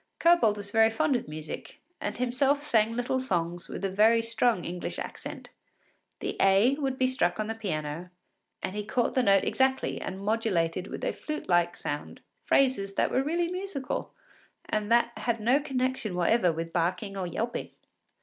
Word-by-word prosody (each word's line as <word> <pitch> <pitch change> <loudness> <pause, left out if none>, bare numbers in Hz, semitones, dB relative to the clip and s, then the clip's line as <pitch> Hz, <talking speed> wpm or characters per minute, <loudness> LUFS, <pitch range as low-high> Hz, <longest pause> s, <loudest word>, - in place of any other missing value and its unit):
Kobold 335 -12 +4
was 205 0 -8
very 225 0 +5
fond 300 +4 +1
of 245 - -2
music, 155 +1 -7 0.2
and - - -3
himself 265 +4 +1
sang 225 -6 +3
little 245 +2 0
songs 175 -7 -2
with - - -5
a 195 - -1
very 225 +4 +4
strong 230 -3 +1
English 175 +1 -4
accent. - - -7 0.7
The - - -3
A 195 +7 +5
would 270 -2 -1
be 260 - +2
struck 215 -8 +1
on 215 - 0
the 225 - -3
piano, 170 -5 -4 0.5
and 190 - -3
he 210 - -2
caught 240 +4 0
the 260 - +3
note 195 -5 +4
exactly 265 0 +1
and 190 +1 -5
modulated 195 -5 0
with - - -7
a - - 0
flute 305 0 -5
like 175 -1 +2
sound 145 0 -5 0.2
phrases 200 -8 +2
that - - +1
were 260 - +2
really 340 +4 0
musical 365 -8 -4 0.6
and 215 +1 -1
that 235 0 +3
had 235 -2 -1
no 245 +6 +3
connection 260 -7 -2
whatever 180 +1 +3
with 165 +1 -5
barking 180 +4 -1
or 190 -2 -3
yelping. 230 +7 -3
225 Hz, 175 wpm, -28 LUFS, 185-260 Hz, 0.7 s, very